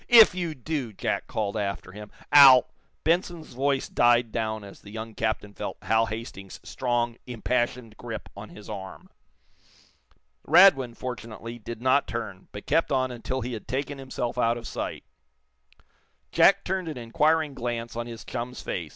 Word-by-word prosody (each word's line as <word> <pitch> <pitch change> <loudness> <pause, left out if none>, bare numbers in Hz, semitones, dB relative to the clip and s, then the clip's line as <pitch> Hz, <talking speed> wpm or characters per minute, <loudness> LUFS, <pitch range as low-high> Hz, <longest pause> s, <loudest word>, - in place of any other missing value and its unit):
"If 230 -5 +9
you 175 -4 -3
do," 135 -3 -3
Jack - - -2
called 105 -1 -2
after 100 -3 -3
him, 105 +1 -10 0.2
"I'll 135 -3 +9 0.2
" - - -44
Benson's 170 -2 0
voice 135 +2 0
died 120 -1 +3
down 110 -2 -2
as 100 -1 -12
the 100 - -13
young 110 +1 -7
captain 110 -2 -2
felt - - -5
Hal 115 0 +2
Hastings's 105 -3 -7
strong, 120 -2 -1
impassioned 120 -1 -2
grip 115 -3 -7
on 100 +2 -9
his 105 - -12
arm. 95 -3 -8 1.3
Radwin, 145 -8 +6
fortunately, 115 -2 -7
did 115 +1 -8
not 130 +2 +3
turn, 110 -5 -6
but 105 - -9
kept 165 - +1
on 130 -1 +1
until 125 +2 -4
he 125 +1 -4
had 110 - -7
taken 140 +1 -3
himself 125 -2 -4
out 115 0 +2
of 120 - -8
sight. - - -5 1.3
Jack 195 0 +5
turned 185 -1 -2
an 155 - -5
inquiring 150 +6 +1
glance 120 -2 -4
on 120 0 -4
his 115 -1 -9
chum's 125 0 -5
face. 85 -3 -4
120 Hz, 160 wpm, -26 LUFS, 110-135 Hz, 1.3 s, If